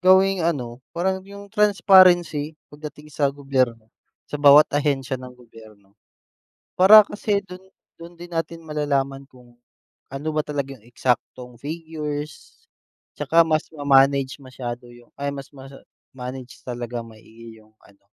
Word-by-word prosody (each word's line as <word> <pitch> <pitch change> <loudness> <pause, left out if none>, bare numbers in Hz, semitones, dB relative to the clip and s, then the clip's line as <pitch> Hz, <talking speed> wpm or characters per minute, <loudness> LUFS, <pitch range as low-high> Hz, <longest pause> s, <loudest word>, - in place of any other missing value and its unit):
gawing 190 +1 +4
ano 130 -8 -2 0.2
parang 190 +2 0
'yung 200 0 -12
transparency 180 -7 +4 0.2
pagdating 150 0 -11
sa 140 0 +1
gobyerno. 130 -5 -2 0.3
Sa 150 - -7
bawat 145 +1 +7
ahensiya 135 -3 -1
ng 125 -1 -11
gobyerno, 110 -4 -18 0.8
para 200 +4 +9
kasi 205 0 -1
dun 180 +1 -11 0.3
dun 170 +1 -12
din 175 +1 -11
natin 165 0 -4
malalaman 140 -3 -2
kung, 125 -2 -20 0.6
ano 140 +3 -5
ba 155 - +1
talaga 140 -2 -4
'yung 110 - -25
eksaktong 125 0 -3
figures, 155 - -7 0.5
at - - -4
saka 165 - +2
mas 155 -1 0
ma-manage 140 -2 +3
masyado 125 -1 -7
'yung 120 0 -18
ay 140 0 -3
mas 140 -1 -8
ma-manage 130 -1 -11
talaga 120 -1 -5
maigi 115 0 -15
'yung 110 0 -24
ano 100 0 -23
140 Hz, 130 wpm, -22 LUFS, 125-165 Hz, 0.8 s, para